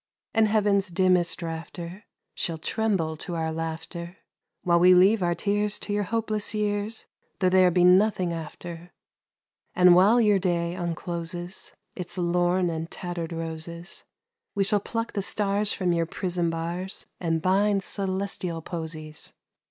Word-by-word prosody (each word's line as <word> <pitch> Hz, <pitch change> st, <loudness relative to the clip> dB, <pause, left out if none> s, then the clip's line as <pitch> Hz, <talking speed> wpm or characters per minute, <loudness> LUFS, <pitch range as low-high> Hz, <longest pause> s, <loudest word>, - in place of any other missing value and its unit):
And 225 Hz, -1 st, +4 dB
heaven's 205 Hz, -2 st, +2 dB
dimmest 180 Hz, -1 st, +2 dB
rafter 170 Hz, +3 st, -6 dB, 0.3 s
Shall 165 Hz, -2 st, -3 dB
tremble 185 Hz, -3 st, 0 dB
to 175 Hz, +2 st, -5 dB
our 160 Hz, -1 st, -1 dB
laughter, 165 Hz, +2 st, -5 dB, 0.5 s
While 170 Hz, -1 st, +4 dB
we 180 Hz, +1 st, +7 dB
leave 195 Hz, +4 st, +5 dB
our 175 Hz, -1 st, +1 dB
tears 205 Hz, +3 st, 0 dB
to 205 Hz, -, -4 dB
your 205 Hz, 0 st, 0 dB
hopeless 215 Hz, 0 st, 0 dB
years, 210 Hz, +1 st, -2 dB, 0.3 s
Though 185 Hz, -, +2 dB
there 185 Hz, 0 st, +5 dB
be 180 Hz, 0 st, +3 dB
nothing 185 Hz, -1 st, +4 dB
after; 170 Hz, +2 st, -8 dB, 0.8 s
And 180 Hz, -1 st, +7 dB
while 200 Hz, +7 st, +6 dB
your 210 Hz, -4 st, +4 dB
day 170 Hz, -2 st, 0 dB
uncloses 175 Hz, 0 st, -5 dB, 0.2 s
Its 180 Hz, 0 st, -5 dB
lorn 175 Hz, +1 st, +2 dB
and 165 Hz, 0 st, -4 dB
tattered 175 Hz, -2 st, -5 dB
roses, 165 Hz, +1 st, -6 dB, 0.5 s
We 200 Hz, -, +2 dB
shall 205 Hz, +1 st, +2 dB
pluck 230 Hz, +3 st, -4 dB
the 200 Hz, -, -1 dB
stars 205 Hz, +1 st, 0 dB
from 180 Hz, -2 st, 0 dB
your 165 Hz, -1 st, 0 dB
prison 175 Hz, -1 st, -1 dB
bars 170 Hz, +3 st, -4 dB
And 165 Hz, -2 st, 0 dB
bind 195 Hz, +3 st, +2 dB
celestial 190 Hz, -4 st, -3 dB
posies. 155 Hz, -3 st, -6 dB
180 Hz, 140 wpm, -26 LUFS, 170-200 Hz, 0.8 s, we